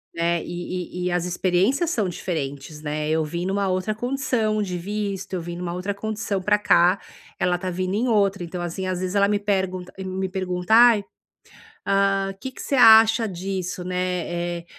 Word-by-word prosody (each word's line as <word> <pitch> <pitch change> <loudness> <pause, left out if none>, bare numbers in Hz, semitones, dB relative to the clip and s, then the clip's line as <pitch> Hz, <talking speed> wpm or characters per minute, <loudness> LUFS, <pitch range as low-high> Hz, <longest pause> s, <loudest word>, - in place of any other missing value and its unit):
né. 170 0 +1
E 180 +1 -5
e - - -1
e - - -1
as 175 0 0
experiências 190 - +1
são 215 - 0
diferentes, 150 -4 -5
né. 150 0 -3
Eu 160 0 +1
vim 170 +3 -4
numa 195 +1 0
outra 185 +3 -1
condição 240 -2 -1
de 180 -3 -3
visto, 195 +1 -4
eu 180 - -1
vim 170 +1 -6
numa 175 -1 -4
outra 180 +3 -3
condição 205 -1 -3
para 210 +2 +3
cá, 180 -2 +4 0.4
ela 180 0 +1
está 185 +1 -4
vindo 185 +1 -2
em 225 +5 0
outra. 200 -4 +2
Então 175 +1 -5
assim, 175 +2 -4
às 185 -1 -2
vezes 185 +1 -3
ela 200 0 +4
me 205 0 +2
pergunta 190 -3 -2
me 190 0 -3
pergunta: 180 +1 -2
"Ai, 230 -2 +7 0.8
hã, 195 0 +2
que 265 - -5
que - - -10
cê 280 - -1
acha 225 -1 +7
disso, 185 -1 -4
né. 175 -1 -2
Eh, - - -17
185 Hz, 185 wpm, -23 LUFS, 175-205 Hz, 0.8 s, Ai